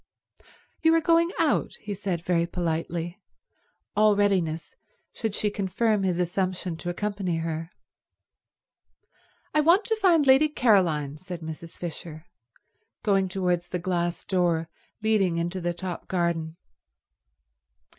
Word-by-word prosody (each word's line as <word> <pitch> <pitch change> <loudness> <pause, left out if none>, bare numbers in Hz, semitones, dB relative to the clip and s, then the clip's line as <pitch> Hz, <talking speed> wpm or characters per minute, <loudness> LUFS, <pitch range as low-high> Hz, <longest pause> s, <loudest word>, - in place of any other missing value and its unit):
"You 325 0 +5
are - - +5
going 335 +1 +4
out," - - +1
he 205 - -4
said 185 -4 -3
very 170 -1 +2
politely, 170 +2 -3 0.7
all 210 0 +5
readiness 185 -6 0 0.4
should 220 -3 -3
she 210 - 0
confirm 205 +2 0
his 185 -3 0
assumption 180 0 -1
to 175 - -5
accompany 195 -2 -2
her. 165 0 -3 1.8
"I 305 - +4
want 350 +7 +4
to 445 - +1
find 350 -8 +4
Lady 270 +3 +6
Caroline," 170 - +2
said 180 -1 -7
Mrs. 160 +1 -8
Fisher, 165 -1 -7 0.8
going 195 -3 +2
towards 180 -2 0
the 180 - -3
glass 175 -1 -1
door 170 -4 +1 0.3
leading 200 -6 +2
into 175 +2 -2
the 175 0 0
top 175 0 -6
garden. 170 -2 -1
180 Hz, 125 wpm, -26 LUFS, 170-210 Hz, 1.8 s, Lady